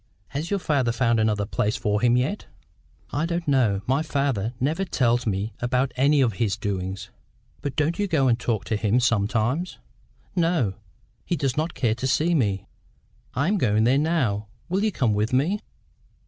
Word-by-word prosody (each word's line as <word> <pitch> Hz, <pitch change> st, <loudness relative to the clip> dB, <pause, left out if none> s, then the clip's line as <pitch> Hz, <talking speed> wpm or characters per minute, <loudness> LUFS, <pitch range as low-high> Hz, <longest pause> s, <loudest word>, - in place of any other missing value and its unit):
"Has 150 Hz, +5 st, -4 dB
your 200 Hz, -, +1 dB
father 140 Hz, -9 st, +1 dB
found 115 Hz, -1 st, +2 dB
another 105 Hz, -2 st, +1 dB
place 105 Hz, +2 st, -1 dB
for 105 Hz, 0 st, 0 dB
him 120 Hz, 0 st, +4 dB
yet?" 140 Hz, +12 st, -1 dB, 0.6 s
"I 150 Hz, +4 st, 0 dB
don't 170 Hz, -1 st, -3 dB
know. 120 Hz, -9 st, +2 dB
My 135 Hz, +4 st, +1 dB
father 135 Hz, -7 st, -1 dB
never 155 Hz, +9 st, 0 dB
tells 120 Hz, -8 st, +1 dB
me 105 Hz, +2 st, -1 dB
about 125 Hz, +2 st, 0 dB
any 140 Hz, +3 st, +4 dB
of 120 Hz, -5 st, +2 dB
his 105 Hz, -3 st, +1 dB
doings." 95 Hz, -2 st, -4 dB, 0.5 s
"But 140 Hz, -, -4 dB
don't 160 Hz, +5 st, 0 dB
you 205 Hz, -, +1 dB
go 150 Hz, -7 st, +2 dB
and 120 Hz, -1 st, +2 dB
talk 110 Hz, -5 st, -1 dB
to 110 Hz, -, -1 dB
him, 105 Hz, +3 st, +2 dB
sometimes?" 120 Hz, -, 0 dB, 0.6 s
"No. 165 Hz, -, +1 dB, 0.5 s
He 175 Hz, -, -1 dB
does 135 Hz, -4 st, -1 dB
not 155 Hz, +2 st, -2 dB
care 115 Hz, -4 st, +1 dB
to 125 Hz, +3 st, -3 dB
see 160 Hz, +6 st, +2 dB
me." 100 Hz, -, +1 dB, 0.7 s
"I 140 Hz, +5 st, +1 dB
am 205 Hz, +1 st, +1 dB
going 110 Hz, -5 st, +2 dB
there 130 Hz, +4 st, +4 dB
now: 130 Hz, -11 st, 0 dB, 0.2 s
will 190 Hz, +3 st, 0 dB
you 215 Hz, -, +2 dB
come 120 Hz, -, +1 dB
with 105 Hz, +4 st, 0 dB
me?" 160 Hz, +11 st, +2 dB
125 Hz, 180 wpm, -24 LUFS, 110-155 Hz, 0.7 s, him